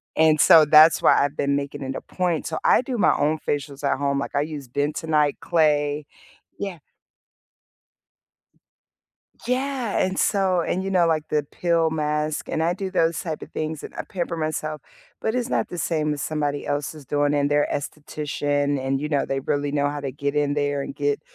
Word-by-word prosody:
And 155 Hz, -1 st, +4 dB
so 160 Hz, -2 st, +8 dB
that's 155 Hz, +2 st, +7 dB
why -, -, +5 dB
I've 145 Hz, +1 st, -2 dB
been 140 Hz, 0 st, 0 dB
making 140 Hz, 0 st, -4 dB
it 135 Hz, 0 st, -4 dB
a -, -, -5 dB
point, 175 Hz, -4 st, -2 dB
so 160 Hz, -, -3 dB
I -, -, +5 dB
do 255 Hz, -1 st, -4 dB
my 205 Hz, -, +4 dB
own 155 Hz, +1 st, +1 dB
facials 145 Hz, -1 st, -3 dB
at 140 Hz, -, +1 dB
home, 140 Hz, 0 st, 0 dB
like 140 Hz, -, -5 dB
I 145 Hz, -, +3 dB
use 145 Hz, -3 st, -5 dB
bentonite 150 Hz, +2 st, 0 dB
clay 150 Hz, -3 st, +1 dB, 0.5 s
Yeah. 195 Hz, -4 st, -4 dB, 2.7 s
Yeah, 255 Hz, -2 st, -1 dB
and 190 Hz, 0 st, 0 dB
so 190 Hz, -3 st, +2 dB
and 185 Hz, +3 st, -2 dB
you 195 Hz, -, -2 dB
know, 180 Hz, -3 st, +3 dB
like 155 Hz, -2 st, 0 dB
the 150 Hz, -1 st, +1 dB
peel 170 Hz, -2 st, +1 dB
mask 150 Hz, 0 st, -2 dB
and 160 Hz, -, -1 dB
I 170 Hz, +2 st, +1 dB
do 190 Hz, 0 st, -4 dB
those 165 Hz, -3 st, +1 dB
type 160 Hz, -3 st, -5 dB
of -, -, -9 dB
things 155 Hz, -1 st, -4 dB
and -, -, -9 dB
I -, -, -4 dB
pamper 175 Hz, -2 st, -3 dB
myself, 155 Hz, -1 st, -3 dB, 0.4 s
but 220 Hz, -, -1 dB
it's 250 Hz, -1 st, -1 dB
not -, -, 0 dB
the 175 Hz, -, -7 dB
same 155 Hz, -1 st, 0 dB
as 145 Hz, -, -5 dB
somebody 145 Hz, -2 st, -2 dB
else 145 Hz, +1 st, -2 dB
is 150 Hz, -4 st, -13 dB
doing 145 Hz, +1 st, +1 dB
and 145 Hz, 0 st, +1 dB
they're 145 Hz, 0 st, +3 dB
esthetician 145 Hz, -1 st, -2 dB
and 135 Hz, 0 st, 0 dB
you 150 Hz, -, -3 dB
know, 145 Hz, -2 st, +1 dB
they 135 Hz, 0 st, -2 dB
really 145 Hz, +1 st, -1 dB
know 145 Hz, -1 st, +1 dB
how 145 Hz, 0 st, -4 dB
to 135 Hz, -2 st, -4 dB
get 140 Hz, +2 st, -3 dB
in 145 Hz, -1 st, +1 dB
there 145 Hz, -1 st, 0 dB
and 140 Hz, -, -7 dB
get, 145 Hz, 0 st, -1 dB
150 Hz, 200 wpm, -23 LUFS, 145-165 Hz, 2.7 s, so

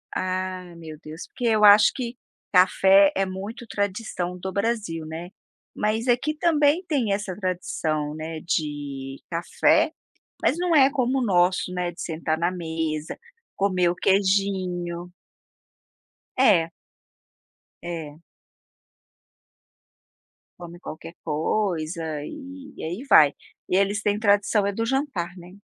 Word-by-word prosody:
Ah, 185 Hz, -1 st, -3 dB
meu 160 Hz, -2 st, -9 dB
Deus. 155 Hz, +2 st, -9 dB
Porque 245 Hz, -, -6 dB
eu 215 Hz, -2 st, +3 dB
acho 205 Hz, +1 st, +8 dB
que 245 Hz, -1 st, -5 dB, 0.4 s
café 190 Hz, +2 st, +6 dB
é 195 Hz, -, +1 dB
muito 200 Hz, +6 st, -7 dB
tradição 200 Hz, -3 st, -3 dB
do 190 Hz, +1 st, -5 dB
Brasil, 200 Hz, -7 st, -2 dB
né, 165 Hz, +3 st, -7 dB, 0.5 s
mas 220 Hz, +3 st, -1 dB
aqui 255 Hz, +6 st, +1 dB
também 310 Hz, 0 st, +3 dB
tem 260 Hz, -9 st, 0 dB
essa 195 Hz, -3 st, -3 dB
tradição, 160 Hz, -5 st, -2 dB
né, 160 Hz, 0 st, -5 dB
de 145 Hz, -5 st, -3 dB
café, 300 Hz, -, +2 dB, 0.5 s
mas 295 Hz, -, +2 dB
não 350 Hz, -2 st, +1 dB
é 275 Hz, -2 st, +6 dB
como 260 Hz, 0 st, 0 dB
o -, -, 0 dB
nosso, 180 Hz, -2 st, +2 dB
né, 175 Hz, -1 st, -2 dB
de -, -, -12 dB
sentar 160 Hz, -1 st, -2 dB
na 170 Hz, +1 st, +1 dB
mesa, 160 Hz, -3 st, -4 dB, 0.4 s
comer 185 Hz, -3 st, +2 dB
o -, -, -2 dB
queijinho. 185 Hz, -3 st, 0 dB, 1.2 s
É. 175 Hz, -10 st, +4 dB, 1.1 s
É. 165 Hz, -2 st, -7 dB, 2.4 s
Come 175 Hz, 0 st, -10 dB
qualquer 165 Hz, +2 st, -8 dB
coisa 160 Hz, 0 st, -1 dB, 0.2 s
e 305 Hz, -, -7 dB, 0.4 s
e -, -, -7 dB
aí 175 Hz, +9 st, -4 dB
vai. 150 Hz, -2 st, +8 dB, 0.4 s
E -, -, +1 dB
eles 200 Hz, +2 st, +2 dB
têm 205 Hz, 0 st, 0 dB
tradição 205 Hz, -1 st, +3 dB
é 200 Hz, -, 0 dB
do 230 Hz, +2 st, -2 dB
jantar, 255 Hz, -, -2 dB
né. 175 Hz, +1 st, -12 dB
185 Hz, 125 wpm, -24 LUFS, 165-210 Hz, 2.4 s, acho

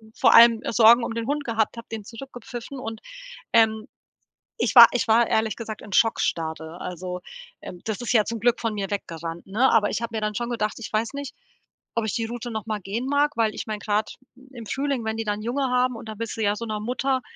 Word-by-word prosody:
vor -, -, +4 dB
allem, 230 Hz, -1 st, +8 dB
äh, -, -, -2 dB
Sorgen 235 Hz, +1 st, +7 dB
um 225 Hz, -, -3 dB
den 230 Hz, +1 st, -3 dB
Hund 290 Hz, 0 st, -1 dB
gehabt, 225 Hz, -1 st, 0 dB
habe 230 Hz, -, -9 dB
den 215 Hz, -3 st, -6 dB
zurückgepfiffen 245 Hz, +1 st, -9 dB
und, 225 Hz, -2 st, -6 dB, 0.5 s
ähm, 220 Hz, +1 st, +3 dB, 0.7 s
ich -, -, +1 dB
war 235 Hz, -1 st, +13 dB
ich 245 Hz, -1 st, -1 dB
war 230 Hz, +2 st, +5 dB
ehrlich 220 Hz, 0 st, 0 dB
gesagt 220 Hz, -2 st, -7 dB
in 200 Hz, -, -12 dB
Schockstarre. 160 Hz, -6 st, 0 dB
Also, 180 Hz, 0 st, -5 dB, 0.4 s
ähm, 175 Hz, -, -9 dB
das 220 Hz, +1 st, -3 dB
ist 240 Hz, -, -1 dB
ja 215 Hz, -3 st, +4 dB
zum 230 Hz, 0 st, -4 dB
Glück 240 Hz, 0 st, +2 dB
von 225 Hz, -2 st, -2 dB
mir 195 Hz, -1 st, -4 dB
weggerannt, 165 Hz, -3 st, -5 dB
ne? 240 Hz, +7 st, +3 dB
Aber 215 Hz, -2 st, +3 dB
ich 235 Hz, -, -3 dB
habe 230 Hz, -1 st, -4 dB
mir -, -, -1 dB
dann 210 Hz, 0 st, -1 dB
schon 240 Hz, 0 st, -3 dB
gedacht: 215 Hz, -3 st, -1 dB
„Ich 225 Hz, -, -8 dB
weiß 225 Hz, +5 st, -1 dB
nicht, 280 Hz, -2 st, -6 dB, 0.6 s
ob 230 Hz, -1 st, 0 dB
ich 215 Hz, -, -2 dB
die 230 Hz, -1 st, -1 dB
Route 240 Hz, +1 st, -6 dB
noch 220 Hz, 0 st, -5 dB
mal 215 Hz, -1 st, -2 dB
gehen 225 Hz, +8 st, -4 dB
mag.“, 290 Hz, +1 st, +1 dB
weil, 220 Hz, -2 st, +1 dB
ich -, -, -5 dB
meine, 215 Hz, -1 st, -4 dB
grad 210 Hz, 0 st, -1 dB, 0.4 s
im 230 Hz, -3 st, -9 dB
Frühling, 275 Hz, -2 st, -2 dB
wenn 220 Hz, 0 st, -2 dB
die 225 Hz, -, -2 dB
dann 210 Hz, 0 st, -2 dB
Junge 250 Hz, +5 st, -2 dB
haben 250 Hz, -1 st, +2 dB
und 225 Hz, -, -10 dB
dann 215 Hz, 0 st, -8 dB
willst 230 Hz, -1 st, -4 dB
du -, -, -3 dB
ja 205 Hz, 0 st, +2 dB
so 230 Hz, +2 st, -5 dB
'ner 215 Hz, -1 st, -3 dB
Mutter 255 Hz, +3 st, -1 dB
225 Hz, 240 wpm, -24 LUFS, 210-240 Hz, 0.7 s, war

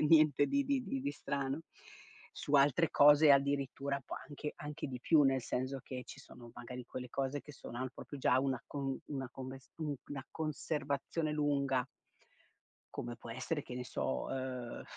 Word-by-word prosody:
niente 155 Hz, -3 st, +6 dB
di 280 Hz, 0 st, +2 dB
di 275 Hz, -2 st, +1 dB
di 135 Hz, -, -2 dB
di 140 Hz, +2 st, -1 dB
strano. 140 Hz, +1 st, -2 dB, 0.7 s
Su 145 Hz, -, -2 dB
altre 145 Hz, +3 st, +5 dB
cose 145 Hz, +1 st, +8 dB
addirittura 140 Hz, 0 st, +1 dB
può -, -, -4 dB
anche 150 Hz, 0 st, -5 dB
anche 150 Hz, 0 st, -5 dB
di 125 Hz, -2 st, -5 dB
più, 155 Hz, +2 st, +5 dB
nel 135 Hz, -2 st, +3 dB
senso 130 Hz, +3 st, -2 dB
che 125 Hz, -1 st, -6 dB
ci -, -, -10 dB
sono 120 Hz, -1 st, -12 dB
magari 125 Hz, +1 st, -7 dB
quelle 125 Hz, -1 st, -6 dB
cose 135 Hz, +2 st, -1 dB
che 150 Hz, -, -12 dB
sono 120 Hz, -3 st, -8 dB
al 130 Hz, 0 st, -2 dB
proprio 145 Hz, 0 st, -8 dB
già 130 Hz, -1 st, +4 dB
una 130 Hz, -1 st, 0 dB
con 135 Hz, -2 st, -2 dB
una 135 Hz, -3 st, -4 dB
conv 130 Hz, 0 st, -6 dB
una 135 Hz, -, -7 dB
conves 130 Hz, -, -24 dB
un 150 Hz, -3 st, -1 dB
una 135 Hz, -2 st, -5 dB
conservazione 155 Hz, 0 st, -1 dB
lunga 140 Hz, -3 st, +2 dB, 1.1 s
come 120 Hz, 0 st, -4 dB
può 115 Hz, 0 st, -9 dB
essere 135 Hz, +5 st, -2 dB
che 125 Hz, -, -8 dB
ne 125 Hz, -, -4 dB
so, 65 Hz, -, -2 dB
ehm, 130 Hz, -2 st, -4 dB
140 Hz, 180 wpm, -35 LUFS, 130-145 Hz, 1.1 s, cose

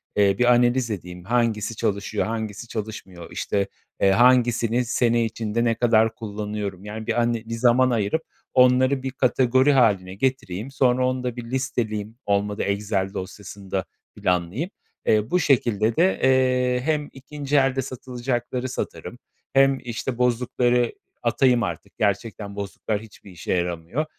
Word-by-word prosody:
eee, 100 Hz, -1 st, +4 dB
bir 125 Hz, -, +4 dB
analiz 120 Hz, 0 st, +2 dB
edeyim: 90 Hz, -3 st, -6 dB
Hangisi 115 Hz, 0 st, 0 dB
çalışıyor, 100 Hz, +1 st, -1 dB
hangisi 110 Hz, 0 st, -4 dB
çalışmıyor? 100 Hz, -6 st, -7 dB
İşte, 100 Hz, -1 st, -1 dB, 0.3 s
eee, 95 Hz, -, +5 dB
hangisini 120 Hz, +1 st, +3 dB
sene 120 Hz, 0 st, +2 dB
içinde 115 Hz, +1 st, -2 dB
ne 115 Hz, -1 st, +2 dB
kadar 115 Hz, -1 st, +3 dB
kullanıyorum, 105 Hz, -3 st, -5 dB
yani, 110 Hz, +1 st, -7 dB
bir 120 Hz, -, +1 dB
ane 115 Hz, -1 st, 0 dB
bir 115 Hz, -, -6 dB
zaman 125 Hz, +2 st, +4 dB
ayırıp 115 Hz, +6 st, 0 dB, 0.3 s
onları 130 Hz, +1 st, +4 dB
bir 130 Hz, -, -2 dB
kategori 130 Hz, +1 st, +3 dB
hâline 100 Hz, -7 st, +2 dB
getireyim. 125 Hz, -1 st, -2 dB
Sonra 130 Hz, -2 st, +2 dB
onu 130 Hz, 0 st, -2 dB
da 125 Hz, -2 st, -3 dB
bir 120 Hz, -, -6 dB
listeleyeyim, 115 Hz, -5 st, -2 dB
olmadı 100 Hz, 0 st, 0 dB
Excel 100 Hz, -1 st, -1 dB
dosyasın 95 Hz, +1 st, -8 dB
da 95 Hz, -2 st, -1 dB, 0.3 s
planlayayım. 90 Hz, -, -1 dB, 0.4 s
Eee, 110 Hz, +1 st, +2 dB
bu 180 Hz, -, +3 dB
şekilde 115 Hz, -, +2 dB
de, 185 Hz, +3 st, +3 dB
eee, 125 Hz, -1 st, +3 dB
hem 150 Hz, 0 st, -1 dB
2'nci 145 Hz, +1 st, -5 dB
elde 135 Hz, -1 st, +2 dB
satılacakları 125 Hz, 0 st, -3 dB
satarım. 125 Hz, -1 st, -5 dB, 0.4 s
Hem, 135 Hz, 0 st, +5 dB
işte, 120 Hz, +1 st, -4 dB
bozukları 125 Hz, 0 st, +1 dB, 0.3 s
atayım 120 Hz, 0 st, +3 dB
artık. 85 Hz, -5 st, -6 dB
Gerçekten 100 Hz, 0 st, -2 dB
bozuklar 105 Hz, +1 st, -3 dB
hiçbir 105 Hz, -3 st, -14 dB
işe 85 Hz, -, -3 dB
yaramıyor. 90 Hz, -, -2 dB
115 Hz, 140 wpm, -24 LUFS, 105-125 Hz, 0.4 s, eee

